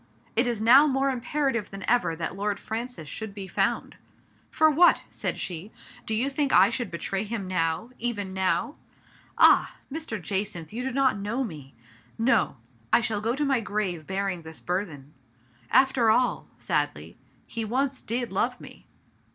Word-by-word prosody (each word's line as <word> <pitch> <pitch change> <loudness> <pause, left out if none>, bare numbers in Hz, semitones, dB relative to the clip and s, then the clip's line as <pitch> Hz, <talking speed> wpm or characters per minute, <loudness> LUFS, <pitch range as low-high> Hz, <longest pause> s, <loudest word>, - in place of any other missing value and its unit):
It 235 +3 +4
is 235 -3 -1
now 255 +7 +7
more 270 0 +1
imperative 260 -3 -1
than 195 -1 -8
ever 200 -9 +2
that 165 +2 -4
Lord 205 +1 -2
Francis 225 -7 -5
should 215 +5 -6
be 195 -2 -6
found. - - -1 0.3
" - - -35
For 315 - +4
what? 325 +4 +5
" - - -30
said - - -1
she. 180 +4 -4 0.2
" - - -20
Do 220 - +1
you 240 +5 +1
think 280 0 0
I 195 +4 +6
should 240 -3 -3
betray 190 +3 -3
him 210 -3 -4
now 175 +5 -1
— - - -31
even 205 -5 -5
now? 190 +10 0 0.6
Ah! - - +5 0.2
Mr. 315 -9 -4
Jacynth, 190 -1 -3
you 240 - -3
do 265 - -2
not 260 -4 +2
know 220 +7 -1
me. 150 - -8 0.4
No! 230 - +2 0.3
I - - +6
shall 220 -2 -1
go 230 +3 0
to 295 +1 0
my 270 -3 +2
grave 190 -7 -3
bearing 190 -2 -2
this 160 0 -9
burthen. 160 -6 -4 0.6
After 260 -3 +4
all" 245 +3 +2
— - - -33
sadly - - -2
— - - -35
" - - -36
he 230 - 0
once 260 +4 -1
did 240 +1 -3
love - - 0
me - - -13
220 Hz, 185 wpm, -26 LUFS, 190-255 Hz, 0.6 s, now